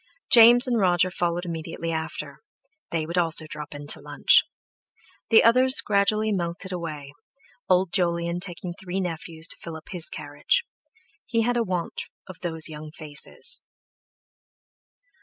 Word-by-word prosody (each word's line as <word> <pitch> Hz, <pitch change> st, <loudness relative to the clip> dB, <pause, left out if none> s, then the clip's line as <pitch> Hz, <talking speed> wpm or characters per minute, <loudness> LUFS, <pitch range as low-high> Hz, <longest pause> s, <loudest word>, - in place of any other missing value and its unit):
James 240 Hz, +1 st, +9 dB
and 245 Hz, -3 st, +1 dB
Roger 180 Hz, -1 st, +2 dB
followed 175 Hz, -1 st, -2 dB
immediately 165 Hz, 0 st, -5 dB
after; 160 Hz, 0 st, -5 dB, 0.5 s
they 160 Hz, -2 st, -2 dB
also 165 Hz, -2 st, +2 dB
would 155 Hz, -, -12 dB
drop 150 Hz, -1 st, -7 dB
in 145 Hz, 0 st, -8 dB
to 145 Hz, -, +1 dB
lunch. -, -, +4 dB, 0.9 s
The 225 Hz, -, +6 dB
others 255 Hz, +3 st, +5 dB
gradually 215 Hz, +1 st, +1 dB
melted 175 Hz, 0 st, -3 dB
away, 155 Hz, -6 st, -6 dB, 0.6 s
Old 185 Hz, -1 st, +2 dB
Jolyon 170 Hz, -1 st, 0 dB
taking 180 Hz, -1 st, -5 dB
three 185 Hz, +1 st, -5 dB
nephews 165 Hz, -2 st, -4 dB
to -, -, -6 dB
fill 165 Hz, -1 st, -8 dB
up 160 Hz, -, -12 dB
his 180 Hz, -3 st, -2 dB
carriage; -, -, -1 dB, 0.6 s
he 230 Hz, -1 st, +1 dB
had 245 Hz, +2 st, 0 dB
a 240 Hz, -, +2 dB
want 180 Hz, -5 st, -3 dB, 0.2 s
of 185 Hz, -3 st, -11 dB
those 160 Hz, -3 st, 0 dB
young 155 Hz, -1 st, -8 dB
faces. 150 Hz, -2 st, -1 dB
175 Hz, 140 wpm, -25 LUFS, 160-200 Hz, 0.9 s, James